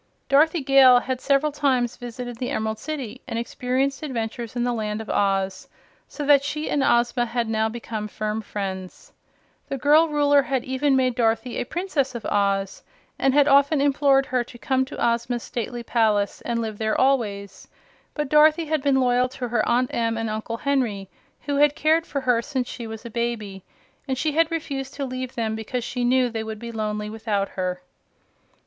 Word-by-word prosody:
Dorothy 310 +4 +4
Gale 265 -2 +7
had 260 -1 -3
several 280 +2 +2
times 265 -5 +1
visited 245 -1 -7
the 245 +1 -3
Emerald 220 0 -2
City 285 -8 -6
and 230 - -3
experienced 255 +4 -1
adventures 235 -4 -4
in 240 - 0
the 245 0 0
Land 215 -2 -3
of 220 - -5
Oz, 195 -1 0 0.4
so 295 - -6
that 280 -1 +5
she 300 +2 -3
and 290 - +1
Ozma 240 0 +2
had 235 0 -1
now 220 0 0
become 220 -2 -5
firm 215 +1 -3
friends. 190 -3 -6 0.6
The 275 - -2
girl 300 +5 +5
Ruler 290 -2 +3
had 265 -3 -2
even 265 +2 +1
made 255 -1 +2
Dorothy 230 0 0
a - - -2
Princess 305 -7 -2
of 235 - -6
Oz, 195 -1 0 0.4
and 270 0 +2
had 290 -1 +5
often 280 +1 +4
implored 275 -1 +3
her 250 -2 0
to 240 - -13
come 260 +2 0
to 270 - -9
Ozma's 235 0 0
stately 240 0 -5
palace 215 -4 +1
and 235 -1 -2
live 215 -2 -5
there 220 -1 0
always; 205 -8 0 0.5
but 300 -1 -2
Dorothy 305 +3 +5
had 310 -1 -1
been 270 -1 +2
loyal 250 0 +2
to 250 -1 -5
her 225 -2 +1
Aunt 245 +1 +1
Em 230 -1 0
and 225 -1 -2
Uncle 220 +2 -4
Henry, 230 -9 -1 0.3
who 285 -1 -2
had 295 0 +4
cared 320 +2 +2
for 280 - -3
her 245 -3 +2
since 260 -1 -3
she 235 -2 -7
was 220 +1 -8
a 235 - -7
baby, 215 -5 -3 0.4
and 265 -1 -1
she 305 +4 0
had 325 +2 +2
refused 285 -5 -4
to 280 - -3
leave 255 0 -5
them 220 -2 -1
because 230 +3 -4
she 245 +1 -3
knew 250 +1 +3
they 225 -1 -3
would 220 0 -6
be 235 +2 -7
lonely 210 -1 -3
without 215 -3 -2
her. 180 -1 -4
245 Hz, 190 wpm, -24 LUFS, 220-275 Hz, 0.6 s, Gale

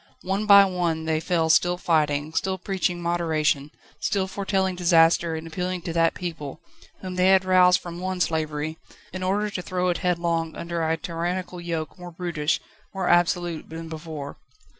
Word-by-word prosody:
One 195 +3 -1
by 200 -1 +9
one 170 -4 -1
they 160 -1 +1
fell 160 -1 +1
still 175 +2 +3
fighting, 150 -3 +1
still 190 +2 -1
preaching 180 -2 -2
moderation, 160 -4 0 0.3
still 200 -2 0
foretelling 190 -1 -1
disaster 170 -1 +4
and 160 0 -6
appealing 180 +2 -3
to 170 - -4
that 165 0 +2
people, 160 -5 -6 0.4
whom 185 -1 -6
they 180 +1 +4
had 190 0 +5
roused 180 -1 +5
from 175 0 -8
one 185 0 -3
slavery, 155 -2 -1 0.3
in 185 - -5
order 205 +3 0
to 185 - -4
throw 180 0 -1
it 175 - 0
headlong 170 -3 0
under 170 0 -4
a 160 0 +1
tyrannical 175 +2 -4
yoke 165 -2 -4
more 180 0 -8
brutish, 170 -2 -1 0.4
more 190 -2 -1
absolute 175 -1 +1
than 165 0 -7
before. 155 -3 -7
175 Hz, 165 wpm, -25 LUFS, 160-185 Hz, 0.4 s, by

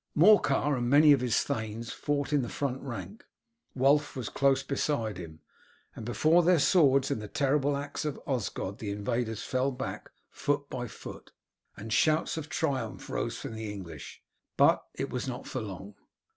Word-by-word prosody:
Morcar 150 -6 +5
and 120 -1 -1
many 150 +2 +7
of 140 -3 +5
his 125 -3 +2
thanes 110 +1 -4
fought 145 0 -2
in 145 - +4
the 120 - -4
front 135 -2 -3
rank. 140 - -7 0.5
Wulf 145 +3 +3
was 125 -4 -4
close 135 -1 +2
beside 115 -8 -1
him, 80 -3 -9 0.5
and - - -7
before 155 +9 +4
their 175 +1 +4
swords 140 -4 +4
and 110 - -1
the 105 - -6
terrible 140 +3 +1
axe 145 0 -4
of 150 -2 -3
Osgod 105 -5 -3
the 105 - -4
invaders 115 +2 -2
fell 130 +1 0
back 130 +1 -6 0.2
foot 145 0 -1
by 125 -1 -3
foot, - - -10 0.5
and 110 +2 -5
shouts 155 +8 +2
of 160 -1 -5
triumph 160 -6 -2
rose - - -2
from - - -6
the 110 -1 -5
English; 95 -5 -9 0.3
but - - +5
it 135 - -3
was 125 +1 -3
not 125 +1 -5
for 130 - -4
long. 100 -1 -7
130 Hz, 170 wpm, -29 LUFS, 115-145 Hz, 0.5 s, many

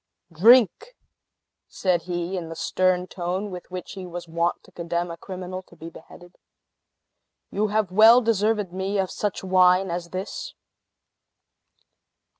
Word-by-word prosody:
"Drink!" 240 - +4 0.7
said 180 -3 0
he, 175 +1 -3
in 170 -3 -5
the 165 - -7
stern 185 +1 +1
tone 185 +3 -4
with 180 -1 -9
which 185 0 -7
he 190 -2 -8
was 175 0 -7
wont 170 +1 -1
to - - -20
condemn 170 0 -3
a - - -6
criminal 185 +1 -7
to 180 - -20
be 165 0 -10
beheaded. 175 +2 -15 1.1
"You 210 +2 0
have 210 -3 -1
well 220 +5 +7
deserved 220 -2 +1
of 185 -4 -5
me 190 +2 -2
such 200 +1 -4
wine 185 0 +4
as 170 0 -4
this!" 185 +3 -6
185 Hz, 140 wpm, -24 LUFS, 175-200 Hz, 1.1 s, well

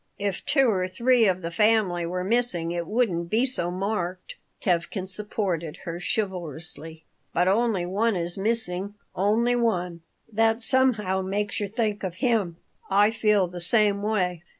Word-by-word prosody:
"If 200 -2 -3
two 275 -2 +4
or 185 -5 +1
three 235 +3 +3
of 185 -1 0
the 165 - -3
family 200 -4 +2
were 180 +1 -3
missing 190 -6 0
it 170 -1 -3
wouldn't 190 -8 0
be 230 +6 +2
so 250 -10 -1
marked," 185 -1 -3 0.3
Tevkin 185 +2 -1
supported 185 -5 -3
her, 170 -1 -5
chivalrously. 165 -5 -4 0.3
"But 175 +2 +3
only 205 -2 +2
one 205 +4 +1
is 175 0 -1
missing, 200 -2 -1 0.2
only 220 +6 +2
one. 180 -8 -1 0.3
That 225 +2 +2
somehow 220 -8 +2
makes 205 +2 -2
you 205 - -2
think 210 -1 -1
of 185 -2 -3
him. 210 -8 0 0.3
I 205 +2 +4
feel 210 -4 +2
the 175 0 -4
same 205 +2 +3
way." 185 -5 0
195 Hz, 150 wpm, -25 LUFS, 175-220 Hz, 0.3 s, two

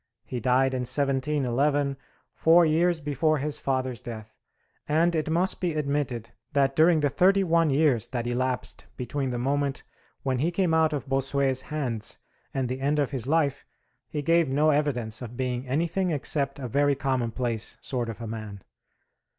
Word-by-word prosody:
He 125 - -4
died 130 +2 +2
in 130 - -1
1711, 140 +1 +1 0.4
four 170 +1 +5
years 165 +2 +2
before 150 +1 +1
his 145 +1 -2
father's 130 -3 -2
death: 110 -4 -8 0.5
and 165 +3 +3
it 155 -1 -1
must 175 +4 +1
be 175 -4 0
admitted 140 -6 -2 0.2
that 135 -1 +2
during 160 +1 +5
the 145 - +2
thirty 195 +6 +3
one 165 -2 +3
years 140 -5 +2
that 120 -2 -3
elapsed 125 +1 -2
between 130 +2 -2
the 120 - -2
moment 140 +2 -1 0.4
when 130 -2 0
he 160 +6 +2
came 175 -1 +1
out 160 -1 +3
of 140 -3 -4
Bossuet's 135 0 +1
hands 130 -8 -3 0.3
and 135 -2 -1
the 130 +2 -4
end 145 +2 +1
of 145 -3 0
his 130 -3 -3
life, 145 -3 +1 0.5
he 150 -1 -3
gave 165 0 +3
no 150 +3 +3
evidence 125 -7 -1
of 120 -1 -8
being 125 0 -2
anything 170 +7 0
except 140 -2 -1
a 135 -3 -5
very 145 +4 +2
commonplace 120 -4 -2
sort 120 -3 -3
of 115 - -7
a - - -4
man. 110 -3 -7
140 Hz, 165 wpm, -26 LUFS, 125-155 Hz, 0.5 s, four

